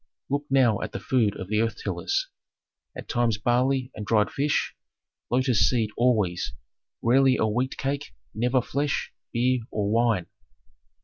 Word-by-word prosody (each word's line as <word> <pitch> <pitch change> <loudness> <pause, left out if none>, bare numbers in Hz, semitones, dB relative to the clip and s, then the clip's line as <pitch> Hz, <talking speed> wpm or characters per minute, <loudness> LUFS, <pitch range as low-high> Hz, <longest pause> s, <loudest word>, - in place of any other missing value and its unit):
"Look 145 +1 0
now 130 -6 +3
at 105 - -5
the - - -3
food 115 -6 +1
of 95 - -5
the 105 +2 +1
earth 115 0 -1
tillers. - - -1 0.7
At - - -8
times 120 -4 +1
barley 125 +3 +1
and 105 - -6
dried 105 -1 +2
fish, 145 +2 0 0.6
lotus 125 -2 +3
seed 115 -4 0
always, 110 -8 +1 0.5
rarely 130 +2 +4
a - - +2
wheat 125 +5 -1
cake, 140 - -3 0.2
never 125 +3 +1
flesh, 140 +1 -2 0.2
beer, 125 +2 +2
or 105 -1 -1
wine. 115 -5 +2
120 Hz, 145 wpm, -26 LUFS, 110-130 Hz, 0.7 s, rarely